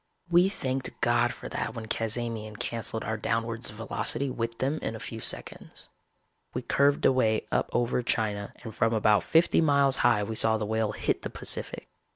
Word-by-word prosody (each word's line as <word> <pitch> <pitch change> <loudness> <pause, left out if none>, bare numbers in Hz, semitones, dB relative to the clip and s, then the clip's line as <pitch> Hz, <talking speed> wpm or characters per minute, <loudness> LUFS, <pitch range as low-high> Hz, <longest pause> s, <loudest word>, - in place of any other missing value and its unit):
We 175 +2 +5
thanked 130 -8 -3
God 120 0 +3
for - - -8
that - - -3
when 115 -1 -5
Cazamian 110 -1 -3
canceled 115 -1 -3
our 110 +1 -2
downwards 115 +2 -1
velocity 115 +5 -2
with 115 -1 -3
them 140 +5 -1
in 115 - -3
a - - -7
few 115 - -6
seconds. - - -3 0.7
We 125 - -2
curved 140 +3 +2
away 110 -4 +3
up - - +1
over 120 +1 +1
China 105 -4 -1
and 110 -2 -7
from 115 -1 +1
about 105 -1 +4
fifty 165 +1 +4
miles 140 -3 +3
high 120 -4 +3
we 110 - -4
saw 110 0 +3
the 110 - -2
Whale 110 0 0
hit - - -1
the - - -4
Pacific. - - -5
115 Hz, 180 wpm, -28 LUFS, 110-130 Hz, 0.7 s, We